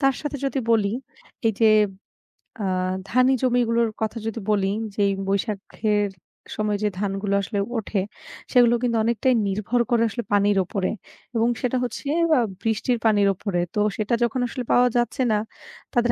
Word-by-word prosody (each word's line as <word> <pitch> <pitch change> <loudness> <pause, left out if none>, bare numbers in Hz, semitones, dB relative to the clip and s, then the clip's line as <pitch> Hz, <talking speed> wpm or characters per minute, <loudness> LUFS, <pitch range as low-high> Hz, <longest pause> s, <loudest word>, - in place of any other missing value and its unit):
তার 270 -2 +3
সাথে 295 -1 -4
যদি 270 0 -1
বলি 210 -2 +3 0.5
এই 225 - +3
যে 220 -1 +6 0.9
আ - - -1 0.4
ধানি 255 +2 +4
জমিগুলোর 235 -2 +2
কথা 220 +1 -1
যদি 225 +1 -3
বলি 195 -1 +2 0.2
যেই 200 -1 +2 0.2
বৈশাখের 205 +1 -1 0.5
সময় 210 -1 0
যে 210 - +3
ধানগুলো 200 0 -1
আসলে 200 +1 -3 0.2
ওঠে, 205 -2 -1 0.5
সেগুলো 240 -1 +5
কিন্তু 235 -2 +1
অনেকটাই 235 +3 +2
নির্ভর 210 +5 0
করে 235 -1 +3
আসলে 235 +3 -4
পানির 205 0 +3
উপরে। 190 +1 -2 0.5
এবং 230 0 +3
সেটা 255 0 0
হচ্ছে 245 +4 -5 0.3
আ - - +4 0.2
বৃষ্টির 225 +2 0
পানির 205 -2 +4
উপরে। 185 -2 -2 0.2
তো 210 - +1 0.2
সেটা 215 +2 -1
যখন 240 +2 0
আসলে 250 +1 -5
পাওয়া 250 0 +5
যাচ্ছে 240 +3 0
না, 210 - +2 0.5
তাদের 240 -1 +3
225 Hz, 155 wpm, -23 LUFS, 205-240 Hz, 0.9 s, যে